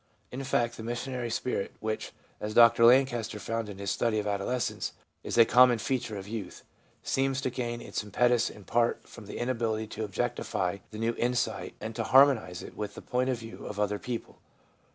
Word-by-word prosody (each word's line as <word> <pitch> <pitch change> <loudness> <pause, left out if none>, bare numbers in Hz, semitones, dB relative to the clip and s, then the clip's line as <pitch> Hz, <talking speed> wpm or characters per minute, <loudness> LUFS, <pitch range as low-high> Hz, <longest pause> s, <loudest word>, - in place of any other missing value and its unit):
In 130 +2 -5
fact, 120 -3 0
the 110 - -7
missionary 120 +1 -3
spirit, 115 -3 -2
which, 110 0 -3 0.3
as 105 0 -4
Dr 115 0 +7
Lancaster 120 -4 +3
found 115 0 -3
in 100 - -8
his 100 -1 -2
study 115 -2 +1
of 105 - -1
adolescence, 105 +4 -2 0.3
is - - -3
a 115 - +8
com 125 +2 +7
mon 120 - +2
feature 115 -1 -2
of 95 0 -7
youth, 105 -4 -6 0.4
seems 135 0 0
to 130 - -1
gain 120 -1 -3
its - - -3
impetus 120 +3 +2
in 105 - -12
part 120 +3 0
from 115 -4 -12
the - - -6
inability 115 -3 -1
to 110 0 -5
objectify 95 -2 -2
the 110 - -9
new 115 +1 0
insight 120 +1 -1
and 110 0 -6
to - - -1
harmonise 130 -9 +4
it - - -10
with 105 -1 -5
the - - -9
point 125 +1 0
of 130 - 0
view 115 0 -10
of 105 - -6
other 105 0 0
people. 120 -2 -6
115 Hz, 195 wpm, -29 LUFS, 105-125 Hz, 0.4 s, a